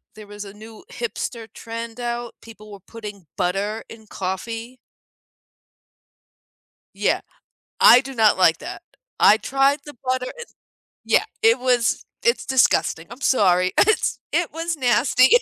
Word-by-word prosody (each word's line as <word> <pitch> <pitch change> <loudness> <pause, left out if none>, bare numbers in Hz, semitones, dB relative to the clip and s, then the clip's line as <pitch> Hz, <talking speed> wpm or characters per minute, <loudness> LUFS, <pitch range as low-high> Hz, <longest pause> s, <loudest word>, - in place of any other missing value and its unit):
there 215 -1 -12
was 205 0 -9
a 200 - -11
new 220 +4 -13
hipster 240 - -5
trend 230 +1 -7
out; 240 -1 -4
people 215 -2 -13
were 200 - -10
putting 205 -2 -10
butter 200 +5 -1
in 225 -1 -12
coffee? 225 +7 -5 2.2
Yeah. - - +1 0.6
I 245 - +8
do 270 0 -8
not 220 -3 +4
like 165 -3 +4
that. - - -8 0.4
I 210 - +7
tried 270 +6 +1
the 295 - -11
butter, 255 0 -1
it 475 -1 -10 0.5
yeah, - - +3 0.2
it 450 +1 +5
was 250 -2 +1 0.2
it's 475 - +2
disgusting, 250 -9 +2
I'm 245 +4 -11
sorry. 185 -8 +3
It's 435 +1 +2
it 345 -2 0
was 330 0 -3
nasty. 255 0 +3
230 Hz, 135 wpm, -22 LUFS, 210-260 Hz, 2.2 s, I